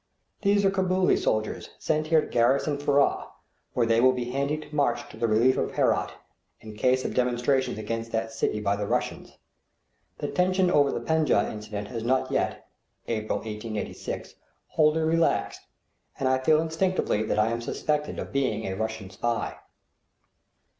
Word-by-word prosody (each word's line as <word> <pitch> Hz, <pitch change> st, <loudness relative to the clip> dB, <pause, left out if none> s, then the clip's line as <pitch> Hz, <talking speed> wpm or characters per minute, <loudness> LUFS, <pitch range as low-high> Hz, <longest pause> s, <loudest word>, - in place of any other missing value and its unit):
These 200 Hz, -1 st, +3 dB
are 195 Hz, -, +4 dB
Cabooli 185 Hz, -1 st, +2 dB
soldiers 110 Hz, 0 st, -1 dB
sent 155 Hz, 0 st, -1 dB
here 160 Hz, -1 st, +4 dB
to -, -, -6 dB
garrison 135 Hz, +5 st, +2 dB
Furrah, 145 Hz, -1 st, +2 dB, 0.5 s
where 120 Hz, -, +3 dB
they 115 Hz, 0 st, +3 dB
will 130 Hz, +1 st, +6 dB
be 125 Hz, -1 st, -3 dB
handy 140 Hz, +3 st, 0 dB
to 150 Hz, -1 st, -10 dB
march 145 Hz, 0 st, +1 dB
to -, -, -12 dB
the 115 Hz, -, +1 dB
relief 115 Hz, +4 st, +3 dB
of -, -, -1 dB
Herat, -, -, +1 dB, 0.5 s
in 110 Hz, -1 st, -10 dB
case 130 Hz, +4 st, +2 dB
of -, -, -2 dB
demonstrations 125 Hz, +1 st, +1 dB
against 115 Hz, +2 st, -4 dB
that 115 Hz, 0 st, -2 dB
city 110 Hz, -1 st, -1 dB
by 100 Hz, -1 st, +1 dB
the 105 Hz, 0 st, -3 dB
Russians. -, -, -3 dB, 0.8 s
The -, -, -3 dB
tension 185 Hz, 0 st, +2 dB
over 145 Hz, -4 st, +4 dB
the -, -, -3 dB
Penjdeh 160 Hz, -1 st, +2 dB
incident 105 Hz, -1 st, -6 dB
has 115 Hz, -1 st, -5 dB
not 130 Hz, +2 st, +1 dB
yet -, -, -1 dB, 0.4 s
(April, 110 Hz, -2 st, -1 dB
1886) 110 Hz, 0 st, -5 dB, 0.4 s
wholly 155 Hz, +1 st, +3 dB
relaxed, 165 Hz, +1 st, +1 dB, 0.6 s
and 135 Hz, -, +1 dB
I 130 Hz, 0 st, +3 dB
feel 155 Hz, +4 st, +4 dB
instinctively 165 Hz, -, 0 dB
that 110 Hz, -, -1 dB
I 110 Hz, +1 st, +3 dB
am 115 Hz, 0 st, -2 dB
suspected 150 Hz, +5 st, -2 dB
of -, -, -5 dB
being 130 Hz, -6 st, 0 dB
a 95 Hz, -, -3 dB
Russian 110 Hz, -2 st, -4 dB
spy. 115 Hz, +4 st, -2 dB
130 Hz, 165 wpm, -26 LUFS, 110-155 Hz, 0.8 s, will